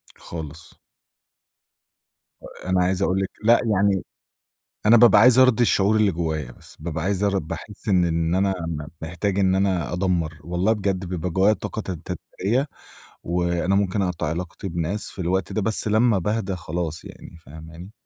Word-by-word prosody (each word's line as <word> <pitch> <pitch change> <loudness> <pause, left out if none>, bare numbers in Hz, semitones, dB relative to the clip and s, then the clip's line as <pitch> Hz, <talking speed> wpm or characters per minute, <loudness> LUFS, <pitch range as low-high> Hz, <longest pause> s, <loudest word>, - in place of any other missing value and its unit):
خالص. 80 -1 -9 1.7
آآ، - - -10
أنا 95 -1 +3
عايز 95 +1 0
أقول 95 0 +1
لِك 95 - -2
لأ 115 +2 +5 0.2
يعني 95 0 +2 0.8
أنا 115 +2 +7
بابقى 110 -3 +7
عايز 125 +1 +6
أرضي 130 -2 +5
الشعور 105 -1 +3
اللي 105 -2 +3
جوّايا 80 -6 -3
بس، - - -16
بابقى 80 0 -4
عايز 100 +1 -1
أرض 100 -1 +1
باحِس 85 +7 -8
إن 90 -2 +4
إن 85 +1 0
أنا 95 0 +2
م 75 -3 -4 0.2
محتاج 95 +4 -2
إن 95 -1 +3
أنا 95 -4 0
أدمَّر. 85 -4 -1
والله 90 +6 +1
بجد 95 -3 -2
بيبقى 90 0 -3
جوّايا 95 +5 +3
طاقة 110 - -5
تتد 90 -5 -6 0.4
تدميرية، 120 +10 +1 0.6
وأنا 85 +2 0
ممكن 100 0 +1
أقطَع 90 -5 -2
علاقتي 85 +4 -5
بناس 85 +4 -3
في - - -12
الوقت 95 +2 -1
ده، 110 - 0
بس 110 +1 0
لمّا 110 0 +3
باهدى 100 0 -2
خلاص 85 -2 -4
يعني، 85 - -12
فاهماني؟ 80 +6 -11
95 Hz, 165 wpm, -23 LUFS, 85-100 Hz, 1.7 s, أنا